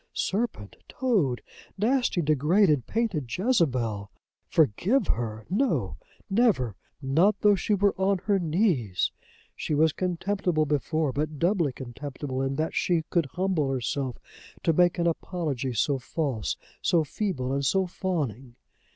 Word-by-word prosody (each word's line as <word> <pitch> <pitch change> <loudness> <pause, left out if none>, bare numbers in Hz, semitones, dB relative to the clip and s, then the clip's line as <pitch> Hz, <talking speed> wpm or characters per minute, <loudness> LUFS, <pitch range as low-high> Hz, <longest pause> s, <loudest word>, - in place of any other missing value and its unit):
Serpent! 195 - -2
Toad! 195 - 0 0.3
Nasty 230 -4 +1
degraded 150 - +3
painted 200 - -1
Jezebel! 125 - +1 0.4
Forgive 170 - +2
her! 110 -2 -2
No, 165 - 0 0.3
never; 195 - +2 0.3
not 165 +10 +3
though 210 -1 +6
she 205 +2 +1
were 200 0 +3
on 195 +1 +3
her 200 -1 +3
knees! 155 - +1 0.4
She 150 - -2
was 155 +1 +3
contemptible 180 -2 0
before, 150 0 0
but 150 +2 -2
doubly 170 -3 +2
contemptible 130 +2 -5
in 135 0 -1
that 155 +3 -1
she 170 -3 +1
could 170 -5 +2
humble 180 -3 0
herself 130 0 -2 0.5
to 165 - +3
make 175 +1 +3
an 170 - 0
apology 160 -6 -2
so 135 +4 +1
false, 130 - -2 0.2
so 170 -2 +3
feeble, 145 -6 -2
and 140 0 0
so 190 +8 +2
fawning. 140 - -3
155 Hz, 130 wpm, -27 LUFS, 130-190 Hz, 0.5 s, though